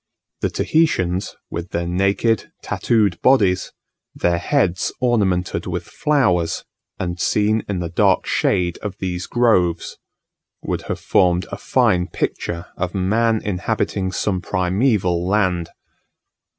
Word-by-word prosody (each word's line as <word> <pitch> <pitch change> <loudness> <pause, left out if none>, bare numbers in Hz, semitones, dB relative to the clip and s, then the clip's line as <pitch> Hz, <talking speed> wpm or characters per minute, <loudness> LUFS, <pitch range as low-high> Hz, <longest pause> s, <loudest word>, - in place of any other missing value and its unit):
The - - 0
Tahitians, 95 - 0 0.2
with 85 +1 -5
their 85 0 -2
naked, 100 +5 +1
tattooed 105 -7 +1
bodies, 100 -9 +3 0.4
their 85 0 +1
heads 95 -4 +1
ornamented 100 -8 +1
with - - -3
flowers, 100 - +1 0.3
and 85 -1 -3
seen 105 +5 +1
in 95 -3 -1
the 85 - -3
dark 85 - +2
shade 90 -3 0
of 100 -2 -6
these 90 -2 -3
groves, 95 -9 +1 0.6
would - - -2
have - - -2
formed 90 0 +2
a - - -4
fine 90 0 +2
picture 85 -2 -3
of 90 +1 -3
man 110 +4 +1
inhabiting 100 -1 -1
some 95 0 -1
primeval 95 -2 +1
land. 95 -4 +1
95 Hz, 120 wpm, -20 LUFS, 90-110 Hz, 0.6 s, bodies